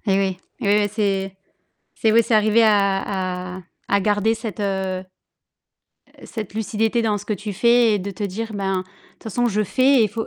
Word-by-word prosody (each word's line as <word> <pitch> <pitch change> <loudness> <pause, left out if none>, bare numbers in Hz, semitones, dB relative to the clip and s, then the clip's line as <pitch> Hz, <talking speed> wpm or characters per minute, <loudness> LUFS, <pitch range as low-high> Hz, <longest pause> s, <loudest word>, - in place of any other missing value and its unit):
eh 195 -1 +3
oui, 190 -2 -1 0.2
eh - - -3
oui, 205 +1 +4
bah, 205 - 0
c'est 195 -2 -1 0.6
c'est 220 - +2
oui, 230 +1 +6
c'est 225 - +1
arriver 215 +2 +4
à 195 -3 0
à - - -9 0.3
à 200 - +2
garder 210 +2 +2
cette, 220 -2 -6
heu, 190 -2 -2 1.2
cette 215 -5 -6
lucidité 220 +1 0
dans 215 -2 +1
ce 205 - -11
que 215 - -2
tu 205 +1 -4
fais 235 +2 +4
et 205 - +1
de 200 +2 -5
te 195 - -8
dire: 220 +3 -4
«Ben, 195 -2 -1
de - - -3 0.3
toute - - -26
façon, 240 +3 0
je 215 -2 +1
fais» 260 +7 +3
et - - +5
il - - 0
faut 225 +2 -4
205 Hz, 210 wpm, -21 LUFS, 195-220 Hz, 1.2 s, oui